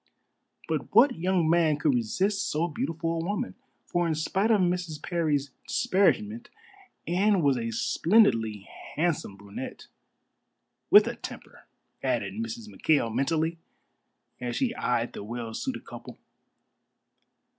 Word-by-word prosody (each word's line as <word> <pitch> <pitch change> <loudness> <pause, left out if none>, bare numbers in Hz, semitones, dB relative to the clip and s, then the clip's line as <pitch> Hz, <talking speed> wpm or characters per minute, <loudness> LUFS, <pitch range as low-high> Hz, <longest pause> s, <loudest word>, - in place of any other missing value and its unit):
But - - -3
what 270 - +6
young 180 -1 +1
man 160 -2 +3
could 150 -2 +2
resist 190 - 0
so 160 +3 0
beautiful 165 +1 -3
a 165 0 -2
woman? 205 +7 -2 0.3
For 175 -1 0
in 160 - 0
spite 195 +7 0
of 220 -3 +4
Mrs. 180 -4 -1
Parry's 150 -5 -1 0.2
disparagement 225 0 +1 0.6
Anne 190 +1 +2
was 140 -2 +4
a 115 -2 -2
splendidly 115 - +2 0.3
handsome 155 - -1
brunette 100 0 -8 1.0
"with - - +8
a - - -4
temper," - - -10 0.3
added - - -1
Mrs. 225 +1 -5
McKail 145 - +1
mentally, 160 +5 0 0.8
as 125 -1 -3
she 250 -3 0
eyed 120 - -1
the - - -7
well 115 +1 -5
suited 260 - -4
couple. - - -10
165 Hz, 125 wpm, -27 LUFS, 135-200 Hz, 1.0 s, with